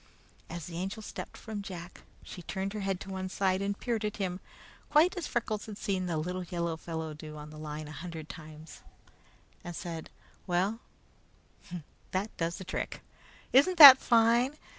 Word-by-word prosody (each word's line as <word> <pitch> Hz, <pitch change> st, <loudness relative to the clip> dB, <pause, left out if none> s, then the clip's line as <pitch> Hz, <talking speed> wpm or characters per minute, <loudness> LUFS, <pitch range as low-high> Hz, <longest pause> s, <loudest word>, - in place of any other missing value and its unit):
As 170 Hz, -1 st, -6 dB
the 170 Hz, -1 st, -7 dB
Angel 195 Hz, +4 st, -4 dB
stepped -, -, -7 dB
from 215 Hz, -2 st, -6 dB
Jack, 180 Hz, -2 st, -8 dB, 0.2 s
she 180 Hz, -, -9 dB
turned 195 Hz, +3 st, -4 dB
her 215 Hz, -, -4 dB
head 195 Hz, -2 st, -1 dB
to 195 Hz, -, -7 dB
one 190 Hz, 0 st, -4 dB
side 190 Hz, 0 st, +1 dB
and 200 Hz, 0 st, -1 dB
peered 230 Hz, -3 st, -1 dB
at 210 Hz, -1 st, -2 dB
him, 185 Hz, -2 st, -2 dB, 0.5 s
quite 325 Hz, +6 st, +5 dB
as 355 Hz, -4 st, -3 dB
Freckles 215 Hz, -3 st, -2 dB
had 210 Hz, -2 st, -7 dB
seen 190 Hz, -3 st, -1 dB
the 165 Hz, -2 st, -1 dB
little 180 Hz, +4 st, -3 dB
yellow 170 Hz, -1 st, -2 dB
fellow 160 Hz, -1 st, -5 dB
do 155 Hz, 0 st, -9 dB
on 150 Hz, 0 st, -9 dB
the 155 Hz, -, -10 dB
line 155 Hz, 0 st, -6 dB
a -, -, -9 dB
hundred 160 Hz, 0 st, -7 dB
times, 155 Hz, 0 st, -11 dB, 0.8 s
and 175 Hz, -1 st, -6 dB
said: 165 Hz, -2 st, -6 dB, 0.4 s
"Well, 190 Hz, +5 st, +1 dB, 1.3 s
that 195 Hz, +4 st, -2 dB
does 165 Hz, 0 st, -1 dB
the -, -, -7 dB
trick! -, -, -4 dB, 0.5 s
Isn't 315 Hz, +8 st, +5 dB
that 275 Hz, -4 st, +13 dB
fine? 235 Hz, +4 st, +3 dB
185 Hz, 175 wpm, -30 LUFS, 165-215 Hz, 1.3 s, that